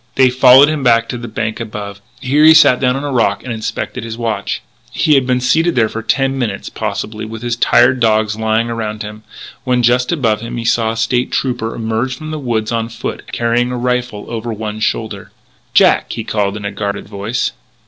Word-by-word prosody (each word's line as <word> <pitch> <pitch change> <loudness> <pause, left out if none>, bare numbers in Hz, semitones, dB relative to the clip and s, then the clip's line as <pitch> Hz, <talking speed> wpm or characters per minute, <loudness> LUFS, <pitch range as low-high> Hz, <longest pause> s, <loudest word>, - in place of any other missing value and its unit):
They 130 -1 +4
followed 130 +2 +7
him 155 -1 -1
back 115 -2 +3
to 125 - -3
the 120 - -7
bank 110 0 -3
above. 105 -3 -7 0.2
Here 145 +4 +2
he 160 +1 +8
sat 140 -6 +6
down 125 -1 +1
on 135 - -4
a 145 - -3
rock 120 -3 +1
and 125 - -4
inspected 110 0 -4
his 115 0 -6
watch. 110 -4 -3 0.3
He 155 - +2
had 135 -2 +3
been 125 -1 +2
seated 160 +7 +2
there 110 -3 +2
for 115 - -5
ten 135 +3 0
minutes, 120 -4 -3
possibly, 110 0 -4
with 110 +1 -7
his 120 -1 -1
tired 125 +1 +4
dogs 110 -2 +2
lying 110 +1 0
around 110 -2 -4
him, 105 +1 -8 0.4
when 125 -2 +1
just 125 +2 +2
above 115 -10 0
him 115 +1 -6
he 115 - -4
saw 115 -1 +1
a - - -7
State 120 +2 0
Trooper 120 -4 -2
emerge 115 +3 -2
from 155 +2 -7
the 155 - -4
woods 115 -5 -2
on 115 -1 -1
foot, 115 - -6
carrying 120 +1 0
a 125 - -3
rifle 125 -3 -2
over 115 0 -4
one 110 0 -5
shoulder. 110 -2 -3 0.4
"Jack!" - - +4
he 115 - -4
called 105 -1 -1
in 105 - -7
a 100 - -2
guarded 100 0 -4
voice. 105 +3 -2
115 Hz, 210 wpm, -16 LUFS, 110-125 Hz, 0.4 s, he